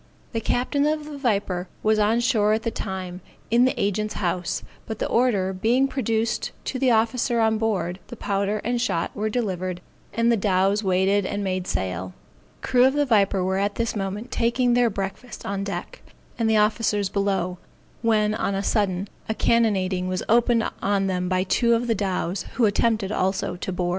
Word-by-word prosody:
The 225 - -2
captain 280 +6 +1
of 305 0 -1
the 300 -1 -7
Viper 200 -7 0 0.2
was 215 0 +3
on 220 +3 +3
shore 215 -4 +3
at 220 0 -1
the 230 - -1
time, 185 -3 -5 0.3
in 240 +2 +5
the 260 - 0
agent's 210 +2 -1
house, 180 -2 -2 0.2
but 220 - -4
the - - -2
order 210 -6 +1
being 235 +8 +2
produced 230 -4 -1
to 260 - -3
the 260 -1 +3
officer 230 +1 +2
on 220 -1 +2
board, 190 -5 -1
the - - -8
powder 200 +1 -1
and 240 +1 0
shot 170 -9 -1
were 215 +1 -1
delivered, 185 -6 -2 0.3
and 230 +2 +2
the 230 - +3
dows 195 +1 +2
weighed 190 +2 +2
and 205 +2 -3
made 185 -1 -2
sail. 90 0 -3 0.5
The - - -4
crew 250 0 +5
of 265 - +4
the 290 0 +2
Viper 200 -6 +2
were 190 +1 0
at 205 +1 0
this 230 -1 -1
moment 205 +4 -4
taking 240 +1 +2
their 245 -1 +4
breakfast 195 +4 -6
on 195 0 -2
deck, 200 - -5 0.4
and 225 -1 +2
the 220 - +4
officers 210 -1 +2
below; 190 -2 -1 0.4
when 215 -2 +2
on 200 -2 -1
a 195 - -1
sudden, 195 -3 0 0.2
a 220 - 0
cannonading 190 -7 +1
was 185 0 -2
opened 235 0 +3
on 200 -1 +1
them 180 -1 -1
by 185 0 +1
two 235 +5 +2
of 235 +1 -1
the 235 - +2
dows, 190 -2 -2
who 240 - +3
attempted 215 -1 +1
also 190 -2 -1
to 180 - -5
board. 180 -1 -1
210 Hz, 190 wpm, -24 LUFS, 190-230 Hz, 0.5 s, in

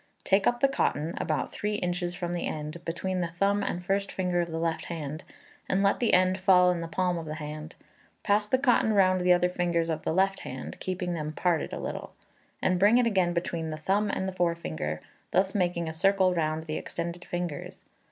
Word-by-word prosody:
Take 195 0 +3
up 240 0 +1
the 275 - +6
cotton, 165 - 0
about 155 -2 -1
three 210 0 -2
inches 175 -2 -2
from 175 0 -3
the 175 - -2
end, 155 +2 -5
between 180 +2 -2
the 170 - 0
thumb 200 +4 +1
and 180 -2 -3
first 195 +1 0
finger 180 -2 0
of 170 - -3
the 160 - -3
left 165 0 -1
hand, 155 -2 -5 0.5
and 195 +1 +2
let 200 - +3
the 240 - +4
end 185 +1 +3
fall 180 -1 +5
in 175 -1 -2
the 165 - -4
palm 180 +1 0
of 160 - -7
the 155 - -4
hand; 155 +1 -7 0.5
pass 210 0 +2
the 260 - +3
cotton 245 -4 +3
round 185 -2 +4
the 180 0 +4
other 180 0 +5
fingers 170 -2 0
of 160 -1 -2
the - - -1
left 195 +3 +2
hand 130 0 -7
(keeping 180 -1 -3
them 155 -2 -3
parted 170 -1 0
a - - -4
little), - - -5 0.5
and 185 -1 +2
bring 205 +5 +6
it 250 - +4
again 190 -6 +2
between 170 -1 -2
the 155 - -4
thumb 200 +6 +1
and 190 -1 -2
forefinger, 80 - -2 0.3
thus 190 +2 +2
making 175 -3 0
a 160 - -3
circle 190 +2 +3
round 160 -2 -1
the 155 -1 -3
extended 170 +1 -5
fingers. 175 -4 -5
175 Hz, 210 wpm, -28 LUFS, 165-190 Hz, 0.5 s, the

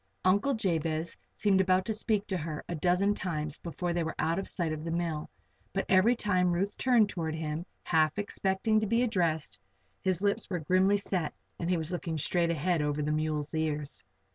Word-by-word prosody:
Uncle 205 +9 +3
Jabez 165 -6 -1 0.2
seemed 195 -2 +3
about 185 0 +2
to 220 - -1
speak 215 -1 0
to 190 - -2
her 155 -2 -5
a - - -3
dozen 180 +5 +2
times 155 -6 -3
before 175 +1 -3
they 170 -1 0
were 160 - -4
out 165 +3 +1
of 195 - -4
sight 165 -4 -1
of 155 0 -5
the 165 - -4
mill; 165 -2 -2 0.4
but 195 - 0
every 195 +6 +5
time 185 -6 +2
Ruth 195 +4 -1
turned 240 -5 +4
toward 160 -5 -3
him, 160 +1 -4 0.2
half 155 0 +2
expecting 205 +1 +1
to 215 - -1
be 230 +3 +2
addressed, 170 - 0 0.4
his 185 0 0
lips 200 0 +1
were 180 - -1
grimly 185 +5 +3
set 185 -5 -2 0.2
and 170 - -2
he 180 - +2
was 160 +1 -2
looking 170 -2 -3
straight 170 +3 +1
ahead 170 +1 +1
over 150 0 0
the 150 - 0
mules' 155 -1 -1
ears. 150 -2 -2
175 Hz, 195 wpm, -30 LUFS, 160-195 Hz, 0.4 s, every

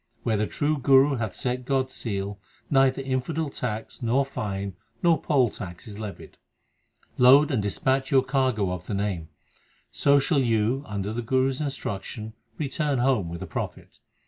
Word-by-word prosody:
Where 110 - +1
the 105 0 0
true 150 0 0
Guru 135 +1 +5
hath 110 -2 -3
set 125 0 -2
God 130 0 0
s - - -9
seal 100 -2 -3 0.3
Neither 135 -1 +3
infidel 135 +4 -2
tax, 110 -3 -5
nor 125 +4 +2
fine, 100 -6 -4 0.3
nor 170 -2 +4
poll 130 -7 +2
tax 90 -1 -8
is 105 -1 -8
levied. 105 -2 -8 0.8
Load 140 +5 +7
and 125 -6 +1
dispatch 130 +6 0
your 135 -2 +4
cargo 130 -7 +1
of 90 0 -5
the 105 - -2
Name, 95 -5 -2 0.6
So 140 0 +4
shall 140 +1 +2
you, 115 +2 +1
under 100 0 -3
the 120 - -2
Guru 130 +3 +2
s 130 - -6
instruction, 110 -5 -4 0.2
return 145 -1 -1
home 120 -8 +2
with 85 0 -6
a - - -5
profit. - - -6
125 Hz, 170 wpm, -26 LUFS, 105-135 Hz, 0.8 s, Load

